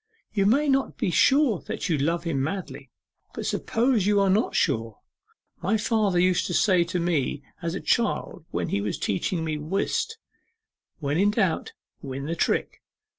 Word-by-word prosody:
You 200 -2 +2
may 285 +8 +3
not 270 -1 +1
be 180 - 0
sure 270 - +4
that - - -3
you 165 - +2
love 165 +4 0
him 160 -6 -1
madly; 145 -5 -5 0.5
but - - -4
suppose 230 -4 +1
you 205 -1 +4
are 195 -1 +3
not 215 +5 +1
sure? 115 -2 0 0.6
My 210 +5 +1
father 210 -4 +1
used 180 0 +2
to 175 - -2
say 185 -4 +4
to 180 +1 -2
me 155 -5 -1 0.2
as 170 0 -2
a - - -3
child 235 -9 0
when 85 0 -2
he 100 - 0
was 105 0 -2
teaching 160 - -1
me 155 -1 -2
whist, 195 - -1 0.8
"When 150 0 -1
in 200 +2 +4
doubt 205 -5 0 0.3
win 135 0 -5
the 165 +3 -2
trick!" - - -1
180 Hz, 175 wpm, -25 LUFS, 150-210 Hz, 0.8 s, sure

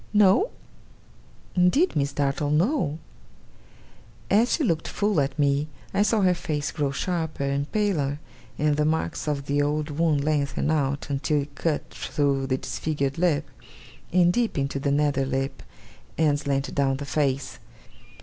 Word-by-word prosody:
'No?' 205 - +5 1.0
'Indeed, 180 - +3
Miss 140 -1 +1
Dartle, 140 +1 0
no!' 160 - +1 1.3
As 220 +5 +4
she 320 - +1
looked 165 - 0
full 205 -6 +1
at 140 +2 -2
me, 145 0 +2 0.3
I - - +2
saw 215 +1 +3
her 185 -1 +4
face 150 -4 -3
grow 145 -2 -1
sharper 160 0 -2
and 140 +1 -1
paler, 165 -10 0 0.4
and 150 -1 +1
the 150 - +2
marks 155 - -1
of 140 -2 -1
the 145 0 +1
old 150 +1 -1
wound 150 -1 +1
lengthen 145 0 0
out 140 -2 -1
until 145 +1 0
it 145 0 -13
cut 155 0 -1
through 140 -2 -1
the 130 0 +1
disfigured 140 0 -2
lip, 160 -4 +1 0.6
and 175 0 +4
deep 235 -4 0
into 140 0 -1
the 140 - -1
nether 145 -1 +2
lip, 135 0 -2 0.6
and 150 -3 +3
slanted 140 -1 -2
down 135 -2 +1
the 145 - -6
face. 140 -2 -1
145 Hz, 150 wpm, -25 LUFS, 140-165 Hz, 1.3 s, No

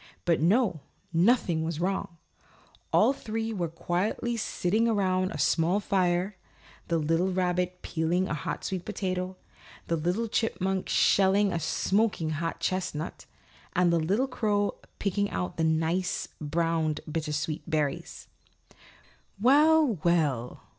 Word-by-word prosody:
But 170 -3 +2
no, 190 0 +3 0.3
nothing 175 -3 +3
was 160 -1 -3
wrong. 180 -1 -2 0.7
All - - +5
three 225 -2 -4
were 175 -5 -1
quietly 180 +8 -2
sitting 220 0 0
around 185 -4 +1
a - - -5
small 165 +6 +2
fire, 185 -1 0 0.5
the 170 - +1
little 165 +4 +1
rabbit 180 0 -1
peeling 170 +3 0
a - - -2
hot 145 -5 -4
sweet 185 -2 -3
potato, 185 -3 -3 0.5
the 170 - 0
little 180 +8 -1
chipmunk 195 -4 -1
shelling 195 0 +3
a 165 - 0
smoking 190 0 0
hot 165 +2 -3
chestnut 175 -4 -3 0.5
and 175 -1 +3
the 170 - +3
little 200 +11 +1
crow 205 -5 0 0.2
picking 205 +1 0
out 90 0 -3
the 165 - 0
nice 160 +3 0
browned 160 0 0
bittersweet 155 -1 -3
berries. 150 -4 -2 1.1
"Well, 290 - +5
well!" 150 -9 0
180 Hz, 125 wpm, -28 LUFS, 165-205 Hz, 1.1 s, All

